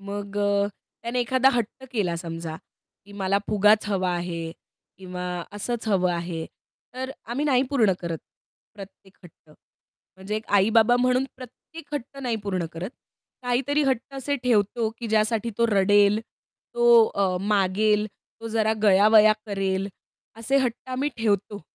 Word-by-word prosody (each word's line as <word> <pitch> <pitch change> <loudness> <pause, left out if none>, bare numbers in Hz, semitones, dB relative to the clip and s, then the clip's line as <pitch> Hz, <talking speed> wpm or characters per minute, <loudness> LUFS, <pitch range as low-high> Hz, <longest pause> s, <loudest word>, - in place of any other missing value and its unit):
मग 200 0 -6
अ, 200 0 +2 0.4
त्याने 235 +2 -1
एखादा 260 +2 +3
हट्ट 240 +2 -3
केला 195 -8 0
समजा, 165 -1 -6 0.5
की 205 - -15
मला 200 0 0
फुगाच 210 +1 +4
हवा 185 -2 0
आहे 170 -2 -4 0.5
किंवा 180 -1 -7 0.3
असंच 225 +3 -3
हवं 185 -3 +2
आहे, 170 -1 -4 0.5
तर 260 +1 -4
आम्ही 245 +6 -3
नाही 260 -4 +3
पूर्ण 230 -9 +3
करत 170 -2 -4 0.6
प्रत्येक 195 -1 -13
हट्ट. 160 -3 -18 0.7
म्हणजे 190 +3 -4
एक 215 - -5
आई-बाबा 220 +4 +5
म्हणून 250 +1 +2
प्रत्येक 290 +4 -11
हट्ट 275 0 -6
नाही 240 -3 -1
पूर्ण 185 -4 -2
करत. 175 +6 -5 0.5
काहीतरी 260 +4 +1
हट्ट 270 0 -1
असे 275 +1 -2
ठेवतो, 230 -1 +1
की 235 - -5
ज्यासाठी 220 +1 +1
तो 235 - +4
रडेल, 205 0 +4 0.5
तो 240 -1 +6
अ, 195 -3 0
मागेल, 210 +1 +2 0.3
तो 225 - -6
जरा 220 -1 +1
गयावया 215 +2 +6
करेल. 195 -1 -1 0.5
असे 230 +5 0
हट्ट 250 -2 -2
आम्ही 260 +3 -1
ठेवतो. 205 -2 -1
210 Hz, 140 wpm, -25 LUFS, 195-240 Hz, 0.7 s, तो